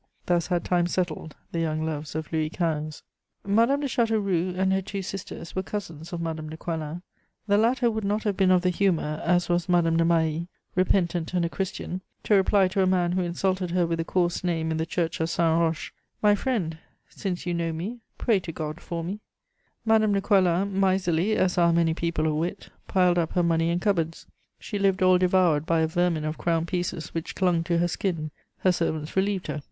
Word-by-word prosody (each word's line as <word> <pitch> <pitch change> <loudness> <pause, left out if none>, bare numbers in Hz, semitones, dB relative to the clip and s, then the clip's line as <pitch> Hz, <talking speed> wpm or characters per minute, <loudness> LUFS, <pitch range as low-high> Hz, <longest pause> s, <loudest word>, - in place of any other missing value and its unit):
Thus 175 -2 +1
had 175 -2 -1
time 175 -1 +2
settled 175 -4 -3 0.2
the 170 - -2
young 160 -1 -1
loves 155 -1 -4
of 160 +1 -4
Louis 155 -1 +1
XV. 155 -3 -2 0.4
Madame 230 +8 +3
de 285 - 0
Châteauroux 200 -7 0
and 190 0 +2
her 190 - +1
two 195 +1 -5
sisters 185 -3 -7
were 190 - +1
cousins 170 -6 -6
of 175 - -4
Madame 160 -2 -4
de 160 - -7
Coislin; 165 +1 -4 0.4
the 205 -1 +3
latter 240 +1 +3
would 220 -1 -3
not 210 +2 0
have 205 -3 0
been 190 -1 +3
of 185 -1 +4
the 180 - +3
humour, 170 -5 0
as 175 0 +2
was 175 0 0
Madame 165 -2 +3
de 165 - +4
Mailly, 165 0 +1 0.3
repentant 180 -2 +1
and 175 -1 +2
a - - -1
Christian, 185 0 -4 0.2
to - - +1
reply 195 0 +4
to 190 +1 0
a 190 - +3
man 180 -2 +2
who 185 +1 +1
insulted 180 +1 -1
her 175 0 +2
with 165 0 -2
a - - +1
coarse 175 +1 0
name 165 -2 0
in 160 - -1
the 160 +1 -2
church 165 0 -1
of 160 0 0
Saint 165 -1 +2
Roch: 165 -1 -1 0.3
"My 210 -1 +5
friend, 195 -8 -1 0.3
since 185 -4 -4
you 175 - -1
know 170 -1 -1
me, 190 +10 -5 0.2
pray 225 -5 +2
to 175 -2 -6
God 155 0 -5
for 170 -1 -4
me." 190 +5 -4 0.7
Madame 220 -2 +4
de 200 - +1
Coislin, 195 -1 +2
miserly 190 +1 +2
as 185 -1 +1
are 170 -1 +5
many 165 -1 +2
people 165 -1 -1
of 155 - +1
wit, 170 +6 -3 0.2
piled 180 -2 +3
up 165 -2 -1
her 180 - +2
money 165 -1 +2
in 170 +1 +1
cupboards. 170 -5 -1 0.3
She 205 - -5
lived 195 -1 +2
all 185 -1 +5
devoured 180 -4 +3
by 165 -1 +2
a 160 - +2
vermin 165 -1 0
of 155 +1 -3
crown 165 -1 +1
pieces 175 -2 -3
which 165 +1 -4
clung 175 -3 +2
to 170 -1 +1
her 175 +1 +2
skin; 165 -4 -2 0.3
her 185 - +4
servants 160 -3 -2
relieved 190 -1 0
her. 150 0 -3
175 Hz, 210 wpm, -26 LUFS, 165-190 Hz, 0.7 s, My